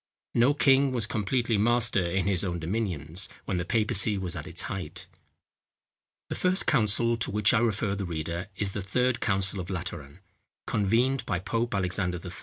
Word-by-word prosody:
No 125 +5 +4
king 135 -1 +4
was 120 -4 +2
completely 115 +1 0
master 115 -3 +2
in 90 +2 -1
his 95 -3 0
own 90 -3 -2
dominions, 85 -2 -2 0.2
when 95 - -2
the 85 - -2
papacy 105 -1 +2
was 90 -2 -4
at 85 +1 -6
its 85 -1 -3
height. 95 -2 -6 1.2
The - - -2
first 185 +1 +1
council 115 -2 +3
to 115 - -1
which 105 +1 +3
I 115 - +4
refer 110 -3 0
the 100 0 -3
reader 85 +2 -4
is 100 0 -1
The 100 - -4
Third 125 +6 0
Council 95 -2 +1
of 90 0 -6
Lateran, 85 -4 -6 0.4
convened 120 +6 +1
by 90 - 0
Pope 115 +5 -2
Alexander 90 -1 -1
III. 90 - -6
100 Hz, 175 wpm, -27 LUFS, 90-115 Hz, 1.2 s, No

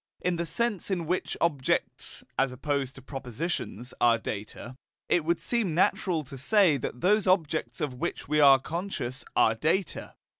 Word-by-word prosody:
In 180 -1 -1
the 170 0 -2
sense 220 +3 -1
in 180 -4 -1
which 180 +3 -2
objects 145 -6 -1
(as 135 -1 +1
opposed 135 0 -2
to 135 - -12
propositions) 135 - -4
are 120 -1 +5
data, 110 +3 -6 0.3
it 175 - +2
would 170 +1 +1
seem 220 -9 0
natural 175 -2 +2
to 135 -1 -10
say 185 - +4
that 125 -1 -5
those 205 +1 +3
objects 155 -9 +1
of 145 -4 -1
which 125 - -4
we 150 +1 +2
are 140 -2 +8
conscious 145 -4 -4
are 110 - +4
data. 160 - -1
150 Hz, 160 wpm, -28 LUFS, 130-180 Hz, 0.3 s, are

